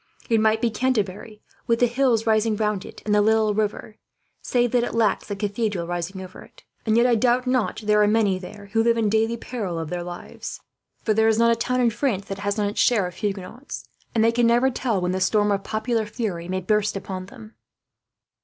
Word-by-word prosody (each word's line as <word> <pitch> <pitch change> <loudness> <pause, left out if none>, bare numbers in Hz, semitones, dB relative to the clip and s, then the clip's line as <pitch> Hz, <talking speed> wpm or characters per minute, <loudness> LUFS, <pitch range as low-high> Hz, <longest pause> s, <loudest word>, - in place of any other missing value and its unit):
It 225 - +4
might 220 0 +2
be 235 - +1
Canterbury, 215 -3 -2 0.2
with 230 0 +2
the 245 - +5
hills 240 -2 +1
rising 220 0 +2
round 210 -2 -1
it - - -12
and 210 - +1
the 210 - +5
little 220 0 +3
river, 210 +1 -2 0.4
save 245 -2 +1
that 245 -1 +2
it 245 - -3
lacks 220 -3 +1
the 205 - -3
cathedral 205 -2 -2
rising 175 +2 -4
over 185 0 -11
it; - - -17 0.2
and 220 +1 +3
yet, 235 - +5
I 250 - +4
doubt 245 +2 +2
not 255 -3 0
there 210 0 +3
are 210 - +4
many 210 -3 +2
there 200 +2 -11
who 225 - +3
live 230 0 +3
in 220 -2 +2
daily 225 +2 +1
peril 210 -8 -4
of 165 -1 -5
their 175 -1 -2
lives, 175 0 -7 0.4
for 215 - +2
there 220 +1 +3
is 220 -1 +3
not 230 0 +4
a - - +3
town 250 +2 0
in 235 -2 +3
France 210 -6 -1
that 195 0 -5
has 205 +1 -2
not 205 -1 +1
its 205 - -5
share 220 -6 +3
of 180 0 -7
Huguenots, 210 +6 -5 0.3
and 220 - +3
they 230 - +4
can 235 0 +2
never 240 +3 +3
tell 240 -5 -1
when 180 0 -1
the 190 0 -2
storm 205 +2 +2
of 195 -1 0
popular 220 +1 -1
fury 200 -7 -4
may 185 +1 -2
burst 210 +2 +1
upon 185 -1 -6
them." 220 +1 -13
215 Hz, 230 wpm, -23 LUFS, 200-230 Hz, 0.4 s, the